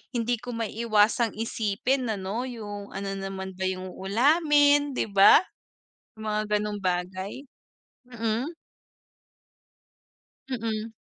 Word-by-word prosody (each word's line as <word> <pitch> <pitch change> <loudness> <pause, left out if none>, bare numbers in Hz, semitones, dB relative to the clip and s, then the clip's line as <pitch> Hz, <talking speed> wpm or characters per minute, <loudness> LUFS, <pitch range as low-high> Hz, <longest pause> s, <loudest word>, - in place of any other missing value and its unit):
hindi 235 0 0
ko 245 0 -6
maiwasang 225 0 +1
isipin 230 +3 -1
ano 215 +4 -3
'yung 205 -5 -7
ano 195 0 -3
nanaman 190 0 -5
ba 190 - 0
'yung 185 0 -4
ulamin 290 - +3
'di - - +1
ba. 200 - +7 0.7
'Yung 220 - -9
mga 215 0 +1
gano'ng 210 0 -3
bagay, 185 +1 -2 0.8
mm. 235 +6 -2 1.9
Mm. 225 -3 -3
220 Hz, 105 wpm, -26 LUFS, 195-245 Hz, 1.9 s, ba